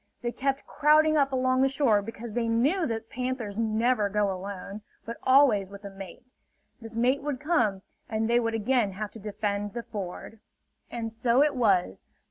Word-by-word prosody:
They 240 - -1
kept 270 +2 -2
crowding 305 +1 +4
up 280 -2 +2
along 255 0 +1
the 270 - +5
shore 260 -7 +2
because 225 +1 -8
they 235 0 -1
knew 280 +11 +2
that 225 0 -5
panthers 250 -4 -3
never 225 -1 +1
go 205 0 +1
alone, 195 +2 -7 0.2
but 230 +2 -6
always 255 -8 +4
with 200 +1 -11
a 200 - -7
mate. 195 0 -11 0.5
This 225 -1 -9
mate 250 +4 +2
would 285 -2 -3
come, 230 - +1 0.3
and 220 0 -1
they 235 +1 +3
would 230 -1 -1
again 225 -2 +1
have 210 +2 -5
to 225 - -11
defend 205 0 -3
the 235 - -5
ford. 205 +1 -7 0.5
And 230 -2 -4
so 235 +4 +3
it 295 -2 0
was. 195 - +1
230 Hz, 180 wpm, -27 LUFS, 205-260 Hz, 0.5 s, the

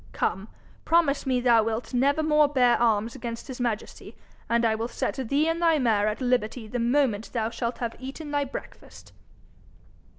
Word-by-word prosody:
Come, 190 +4 -2 0.4
promise 315 -5 +2
me 255 -1 +2
thou 240 -2 +5
wilt 225 +3 -3
never 280 +5 +2
more 300 -1 +4
bear 255 -4 +3
arms 225 -1 +2
against 235 -2 -6
his 260 -2 -7
majesty, 230 -3 -4 0.3
and 235 0 +2
I 225 - +3
will 225 +1 -2
set - - -3 0.2
thee 290 +3 +2
and 330 +1 -1
thy 330 -2 +4
mare 220 -6 +2
at 215 +4 -2
liberty 245 -2 0
the 245 +3 -4
moment 235 -3 +1
thou 225 -2 -1
shalt 235 +1 -3
have 235 -2 -4
eaten 280 +4 -7
thy 290 -1 0
breakfast.' 270 - -10
245 Hz, 175 wpm, -26 LUFS, 230-280 Hz, 0.4 s, thou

